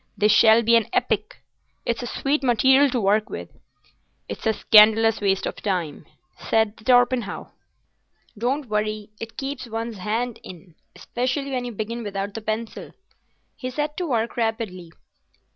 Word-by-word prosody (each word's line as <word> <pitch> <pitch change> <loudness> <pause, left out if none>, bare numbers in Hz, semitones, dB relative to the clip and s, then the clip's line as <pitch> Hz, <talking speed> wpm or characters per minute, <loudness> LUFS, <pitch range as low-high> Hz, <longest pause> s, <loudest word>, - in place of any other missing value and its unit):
This 210 +1 +3
shall 220 +2 +6
be 230 +1 +4
an 230 -2 +3
epic. 380 - -1 0.4
It's 235 0 -1
a 245 - -5
sweet 280 +4 -1
material 265 +3 +4
to 250 - -1
work 210 +2 +1
with." - - -7 0.8
"It's - - -5
a 220 - +3
scandalous 220 +1 +5
waste 195 -1 +1
of - - -4
time," 180 -7 -3 0.4
said 220 -1 +2
Torpenhow. 245 -2 +1 0.8
"Don't 260 +7 -1
worry; 215 0 -2
it 225 0 -8
keeps 275 -2 -5
one's 225 -1 -5
hand 225 +4 -3
in—specially 245 - -6
when 250 -2 -2
you 245 - -5
begin 230 +2 -5
without 200 -1 -4
the 225 - -6
pencil." 220 +1 -5 0.6
He 255 - -5
set 295 +3 -3
to 360 - -2
work 235 -4 -1
rapidly. 220 -7 -3
225 Hz, 145 wpm, -23 LUFS, 210-245 Hz, 0.8 s, shall